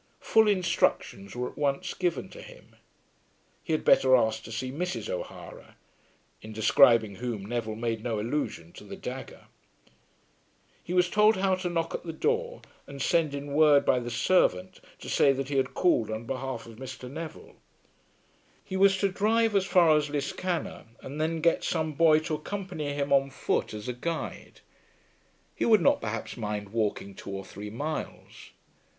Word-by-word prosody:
Full 220 -1 +4
instructions 170 - 0
were 125 0 -2
at - - -14
once 140 -2 -1
given 175 -6 -2
to - - -11
him. - - -15 0.9
He - - -5
had 155 - 0
better 130 -1 +6
ask 110 -2 +1
to - - -9
see 130 +3 -4
Mrs. 180 - -3
O'Hara, - - -8 0.7
in 110 - -10
describing 110 -1 +4
whom 115 -5 -4
Neville 110 -1 -3
made 115 -1 -3
no 115 -3 -2
allusion 110 - -3
to - - -12
the - - -8
dagger. - - -8 1.4
He - - -8
was 180 0 +3
told 210 +3 +4
how 190 0 +2
to 185 -1 -2
knock 165 -1 -2
at - - -3
the 165 - -6
door, 475 - -1 0.2
and 140 0 -9
send 155 +1 +1
in 140 0 -6
word 150 -1 +5
by 125 - +3
the 120 0 -5
servant 115 - +1 0.2
to - - -9
say 140 - +4
that 135 0 -4
he 140 - -1
had 135 0 0
called 125 - +2
on 110 +1 -4
behalf 130 -1 -4
of 115 -1 -13
Mr. 130 0 -8
Neville. 160 +5 -9 1.1
He 190 - -6
was 195 0 +4
to 200 - +2
drive 220 +3 +1
as 195 -1 +2
far 170 -5 +5
as 150 -1 +1
Liscannor, 160 +5 -3 0.2
and 145 +3 -6
then 160 +1 -1
get 170 +1 +2
some 160 -2 -1
boy 155 +1 +5
to 160 0 -4
accompany 165 -2 -4
him 140 0 -1
on 135 0 +3
foot 130 - -1
as 105 +1 -7
a 125 - -2
guide. 165 +7 -5 0.9
He - - -3
would 220 -2 +6
not - - +3
perhaps 115 +2 -5
mind 105 -2 -4
walking 105 -2 -2
two 95 - -10
or 95 -1 -5
three 105 +2 -8
miles. 145 +8 -6
140 Hz, 175 wpm, -28 LUFS, 115-175 Hz, 1.4 s, better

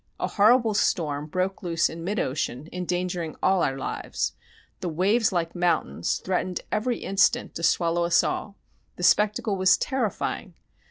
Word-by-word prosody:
A - - 0
horrible 225 +2 +4
storm 150 -7 0
broke 185 +5 -2
loose 170 -3 +1
in 165 +1 -8
mid 205 +5 -2
ocean, 130 +1 -2
endangering 180 -2 -3
all 190 -1 +3
our 135 -3 0
lives.... 135 - -3 0.5
The 180 - -3
waves, 200 +8 +2
like 170 -2 -1
mountains, 170 - 0
threatened 185 -1 -1
every 235 +3 0
instant 195 0 +2
to - - -6
swallow 170 0 +2
us 170 0 +4
all; 200 - -3 0.4
the 180 - -7
spectacle 210 +2 +3
was 185 0 +5
terrifying. 255 -6 -2
180 Hz, 150 wpm, -25 LUFS, 165-200 Hz, 0.5 s, was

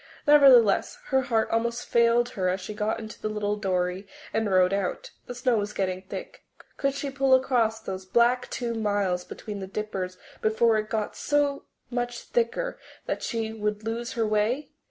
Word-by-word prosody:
Nevertheless, 270 -8 +6
her 265 0 +3
heart 230 -4 0
almost 235 +1 0
failed 235 +1 +3
her 185 -5 -1
as 185 +1 -1
she 190 +3 -6
got 210 +1 -1
into 220 -1 -9
the 215 - -2
little 210 -1 -1
dory 185 -1 -1 0.3
and 220 -2 0
rowed 185 0 +4
out. 195 -2 -2 0.2
The 245 - -6
snow 245 -1 +1
was 210 0 -2
getting 185 -1 -1
thick. 190 - -8 0.3
Could 275 0 0
she 280 0 -3
pull 270 -1 +4
across 240 -4 +1
those 190 -3 -6
black 240 +5 +3
two 240 -2 -3
miles 205 -5 0
between 205 +2 -7
the 190 - -6
Dippers 190 -2 -4 0.2
before 220 0 +3
it 215 0 -5
got 215 -2 -2
so 290 -1 0 0.3
much 245 0 -2
thicker 240 - -1 0.3
that - - -3
she 225 -2 -2
would 210 -1 -2
lose 235 +2 -3
her 230 -2 0
way? 215 +7 0
220 Hz, 175 wpm, -26 LUFS, 205-245 Hz, 0.3 s, Nevertheless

